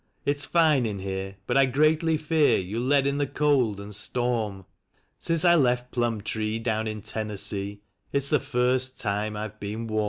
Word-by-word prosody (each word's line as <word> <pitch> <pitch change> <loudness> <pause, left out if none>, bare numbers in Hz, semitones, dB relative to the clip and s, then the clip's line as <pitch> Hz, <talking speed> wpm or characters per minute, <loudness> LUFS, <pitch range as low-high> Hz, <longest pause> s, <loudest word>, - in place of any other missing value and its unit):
It's 145 0 +1
fine 155 -8 +3
in 105 -2 -4
here, 95 0 -5
but - - +1
I 135 -1 +5
greatly 155 +4 +2
fear 155 0 +3
you'll 100 +5 -3
let 135 +2 +3
in 140 +1 0
the 145 - +1
cold 130 -9 +1
and 100 0 -8
storm 110 -3 -2 0.3
— - - -42
Since 165 0 0
I 175 - +7
left 125 -5 +2
Plumtree, 110 -2 -1
down 110 -1 -1
in 110 -2 -5
Tennessee, 100 -1 -3 0.3
it's 140 0 +1
the 150 - +4
first 130 -1 0
time 105 0 -2
I've 110 0 -6
been 105 +3 -5
warm." 110 -1 -1
120 Hz, 180 wpm, -26 LUFS, 105-140 Hz, 0.3 s, I